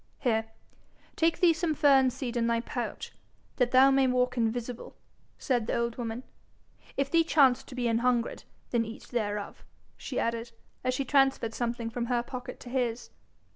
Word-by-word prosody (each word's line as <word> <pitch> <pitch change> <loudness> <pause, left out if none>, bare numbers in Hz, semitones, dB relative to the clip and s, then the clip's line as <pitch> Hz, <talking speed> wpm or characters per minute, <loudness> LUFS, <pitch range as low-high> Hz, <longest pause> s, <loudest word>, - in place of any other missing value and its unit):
'Here, 225 -3 +1 0.7
take 330 0 +2
thee 345 -2 +6
some 320 -1 -1
fern 275 -3 +5
seed 250 -1 -5
in 235 -1 +1
thy 230 0 +2
pouch, 240 +1 -5 0.5
that 250 -2 +2
thou 260 +2 +6
may 270 -1 +4
walk 250 0 +1
invisible,' 235 +1 -3 0.4
said 245 -5 0
the - - 0
old 235 0 -1
woman. 235 0 -4 0.7
'If 275 0 0
thee 335 -1 +5
chance 275 -6 +4
to 255 - -12
be 245 -2 0
an 230 0 +2
hungred, 240 -1 0 0.3
then 235 -2 +2
eat 225 0 -8
thereof,' 210 -4 -3 0.3
she 260 - -4
added, 230 0 -2 0.3
as 255 0 0
she 275 - -2
transferred 270 -4 +2
something 235 -1 -3
from 235 0 -3
her 240 -1 +1
pocket 250 0 -7
to 245 - -9
his. 245 -2 -2
245 Hz, 175 wpm, -29 LUFS, 235-265 Hz, 0.7 s, thee